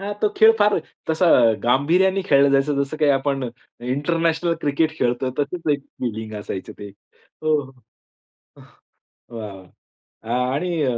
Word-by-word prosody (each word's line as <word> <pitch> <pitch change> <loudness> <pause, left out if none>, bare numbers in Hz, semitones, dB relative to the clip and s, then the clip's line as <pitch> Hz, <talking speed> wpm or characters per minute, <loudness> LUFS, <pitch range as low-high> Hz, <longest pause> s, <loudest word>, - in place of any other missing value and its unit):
हां, 200 +1 -4
तो 210 - +4
खेळ 220 +1 +7
फार 205 -2 +3 0.3
तसा 165 +3 +2 0.4
गांभीर्याने 175 +10 +2
खेळलं 140 0 +5
जायचं 140 +1 +2
जसं 140 +3 -5
काही 150 -2 +3
आपण 135 -2 0 0.3
इंटरनॅशनल 165 +6 0
क्रिकेट 155 +2 0
खेळतो, 125 +1 0
तशीच 155 +2 -2
एक 145 - -1 0.2
फिलिंग 110 -3 -4
असायचं 95 -2 -6
ते 100 - -8
हो. 155 +9 -4 1.0
हं. - - -15 0.7
वाह, 105 -3 -6 0.7
वाह! 125 +2 0
आणि 170 +1 -1
145 Hz, 130 wpm, -22 LUFS, 130-165 Hz, 1.0 s, खेळ